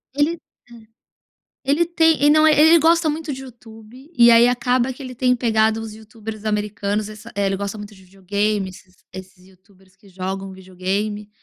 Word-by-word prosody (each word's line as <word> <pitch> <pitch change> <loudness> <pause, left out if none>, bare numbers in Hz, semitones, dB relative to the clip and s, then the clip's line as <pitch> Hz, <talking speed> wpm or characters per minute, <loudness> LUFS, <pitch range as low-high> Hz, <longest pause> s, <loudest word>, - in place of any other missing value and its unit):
Ele, 305 +4 0 0.3
hã 235 - -14
Ele 220 -2 -17 0.8
ele 290 +5 +1
tem 325 -3 +2
e 290 - +6
não 310 +1 +5
é 305 - +4
ele 320 +2 +6
gosta 330 0 +3
muito 305 -1 -4
de 265 - -8
Youtube, 240 +2 -15
e 235 0 +7
aí 230 +1 +6
acaba 250 +1 0
que 265 - -11
ele 255 -1 -8
tem 250 0 +1
pegado 220 -2 +1
os 220 -1 -8
youtubers 220 0 -10
americanos, 210 0 -2
essa 215 0 -12
ele 195 -1 -1
gosta 200 +1 -5
muito 210 0 -10
de 190 -1 -18
videogame 195 +1 -2
esses 185 0 -16 0.2
esses 185 -1 -12
youtubers 190 0 -25
que 205 - -22
jogam 190 +1 -6
videogame, 190 +3 -4
220 Hz, 185 wpm, -20 LUFS, 195-255 Hz, 0.8 s, e